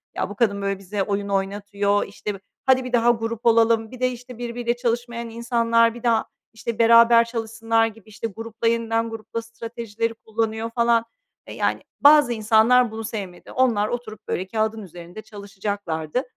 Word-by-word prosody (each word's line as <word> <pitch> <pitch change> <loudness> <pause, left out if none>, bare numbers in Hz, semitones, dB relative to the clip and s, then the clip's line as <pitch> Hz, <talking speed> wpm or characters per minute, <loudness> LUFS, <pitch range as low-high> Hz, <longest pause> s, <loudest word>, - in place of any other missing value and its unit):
Ya, - - -2
bu 205 - -8
kadın, 200 -3 +1
böyle, 195 -1 -2
bize 195 +1 -3
oyun 200 0 -2
oynatıyor, 200 +1 0
işte, 205 +1 -5
bi - - -11 0.3
hadi 260 -1 +4
bir 250 0 -7
daha 240 0 +5
grup 230 0 -4
olalım, 230 -1 +3
bir 255 - -10
de, 255 0 +2
işte, 250 0 -10
birbiriyle 240 0 -2
çalışmayan 235 -1 -2
insanlar, 230 0 +2
bir 240 - -11
daha, 230 -2 +2 0.3
işte, 225 0 -5
beraber 230 0 +7
çalışsınlar 225 -1 0
gibi, 220 -1 -13
işte, 215 +2 -5
grupla, 225 +2 -4
yeniden 230 0 0
grupla 225 +1 -6
stratejileri 230 -1 -5
kullanıyor, 225 0 -3
falan. 235 -1 +3 0.4
E, - - -8
yani, - - -1 0.2
bazı 290 -4 +7
insanlar 225 +2 +4
bunu 225 0 -6
sevmedi. 200 -5 -7
Onlar 235 -5 +2
oturup, 215 -3 -6
böyle, 185 - -2
kâğıdın 220 +1 -1
üzerinde 175 +2 -10
çalışacaklardı. 200 - -4
225 Hz, 165 wpm, -23 LUFS, 210-235 Hz, 0.4 s, beraber